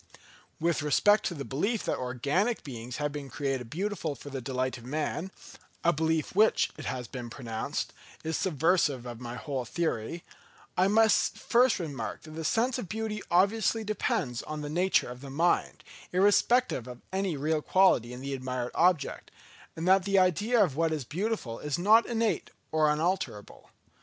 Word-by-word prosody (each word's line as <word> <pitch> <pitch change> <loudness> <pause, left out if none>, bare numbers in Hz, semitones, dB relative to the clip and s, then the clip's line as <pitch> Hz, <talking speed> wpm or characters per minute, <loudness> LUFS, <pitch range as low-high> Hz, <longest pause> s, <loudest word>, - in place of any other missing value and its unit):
With 170 -1 +1
respect 205 +8 +4
to 175 - -4
the 140 -2 -5
belief 200 - -1
that - - -1
organic 140 - 0
beings 125 -3 -7
have 145 0 -1
been 145 -2 -6
created 130 0 -3
beautiful 175 - -2
for 145 - -10
the 135 -1 -4
delight 130 0 -2
of - - -14
man—a 155 +4 -3
belief 160 +2 0
which 215 +2 +4
it - - -8
has 125 -2 -3
been 120 -1 -7
pronounced 115 -3 -4 0.3
is 160 0 -2
subversive 155 -6 +1
of 120 -2 -7
my 120 -1 -6
whole 135 0 -3
theory—I 165 - -3
may 220 +2 +5
first 245 +3 +3
remark 140 - -5
that 155 - -11
the 160 +1 -6
sense 240 +8 +1
of 195 - -6
beauty 215 -1 -3
obviously 210 +5 +2
depends 160 - -1
on 155 0 -6
the 145 0 -5
nature 180 +4 +2
of 125 +1 -8
the 140 - -8
mind, 165 +6 +1 0.3
irrespective 205 - +3
of 125 -1 -9
any 190 -5 -1
real 155 +2 0
quality 170 -11 +3
in 125 +1 -8
the 140 +1 -4
admired 130 -2 -3
object; 175 -4 +1 0.5
and 165 +2 -3
that 190 0 +5
the 200 -1 +2
idea 205 +6 +4
of 155 -9 -1
what 165 +1 +1
is 150 -5 -2
beautiful, 175 - -3
is 150 -1 -2
not 215 +6 +5
innate 230 -2 0 0.2
or 155 -1 +3
unalterable. 155 - -2
155 Hz, 165 wpm, -29 LUFS, 130-190 Hz, 0.5 s, may